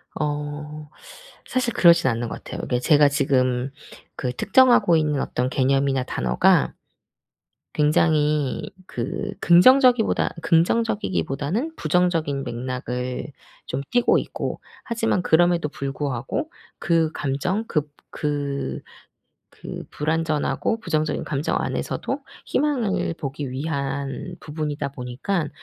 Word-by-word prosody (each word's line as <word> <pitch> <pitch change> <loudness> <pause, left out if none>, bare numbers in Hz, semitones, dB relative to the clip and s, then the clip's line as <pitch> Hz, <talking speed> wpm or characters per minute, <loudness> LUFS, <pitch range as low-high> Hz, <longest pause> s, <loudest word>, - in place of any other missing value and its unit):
어 150 0 -4 0.6
사실 255 -2 0
그러진 170 -5 +6
않는 115 0 -2
것 - - -7
같아요. - - -6
이게 125 - -1
제가 145 +3 +5
지금 130 -3 +1 0.5
그 125 -2 -2
특정하고 240 - +4
있는 150 -3 +1
어떤 125 0 -1
개념이나 135 0 +2
단어가 65 - +2 1.0
굉장히 150 -1 +2 0.2
그 200 +1 -4
긍정적이보다 245 +6 +5
긍정적이기보다는 190 - 0
부정적인 160 -4 +1
맥락을 125 0 -4 0.4
좀 130 +2 -3
띠고 245 -1 +3
있고 - - -4 0.2
하지만 225 -5 0
그럼에도 175 -1 +3
불구하고 140 - -3 0.3
그 165 -2 +1
감정 160 +11 -1
급 150 -7 -2 0.2
그, 140 - -3 0.7
그 - - -8
불완전하고 155 +5 -1
부정적인 155 -7 -1
감정 140 +1 -1
안에서도 - - -3 0.3
희망을 245 - 0
보기 140 -1 -4
위한 140 +2 -3
부분이다 150 -2 -4
보니까 140 +7 -3
150 Hz, 260 characters per minute, -23 LUFS, 135-175 Hz, 1.0 s, 그러진